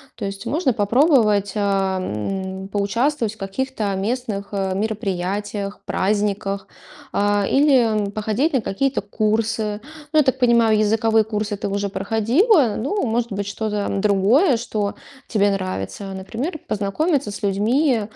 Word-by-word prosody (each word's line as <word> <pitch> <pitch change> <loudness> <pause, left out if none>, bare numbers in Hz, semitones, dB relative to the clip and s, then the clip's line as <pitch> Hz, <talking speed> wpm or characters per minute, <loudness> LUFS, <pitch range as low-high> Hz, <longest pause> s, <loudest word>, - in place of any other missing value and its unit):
То 215 - -5
есть 195 0 -6
можно 295 -4 +1
попробовать, 215 - +3
эм, 190 - -2
поучаствовать 225 +4 0
в - - -24
каких-то 225 +5 -3
местных, 205 0 -2
э, 195 -2 -1
мероприятиях, 200 0 -3
праздниках, 200 0 -1 0.4
а, 205 0 +1
или 235 -8 +3
походить 220 +9 -1
на 260 - +2
какие-то 260 +5 -1
курсы. 215 +1 -1 0.3
Ну, 310 - +1
я 300 - +6
так 260 0 0
понимаю, 235 -3 +4
языковые 220 +1 +3
курсы 210 -1 -3
ты 200 - -4
уже 200 0 -2
проходила, 230 - +2
ну, 290 - -1
может 235 0 -1
быть, 200 0 -2
что-то 210 0 -2
другое, 215 - +3
что 210 -3 -2 0.3
тебе 205 -2 +2
нравится. 185 - -2 0.3
Например, 235 - -4
познакомиться 265 - 0
с 205 - -7
людьми, 225 +6 +2
210 Hz, 130 wpm, -21 LUFS, 200-240 Hz, 0.4 s, я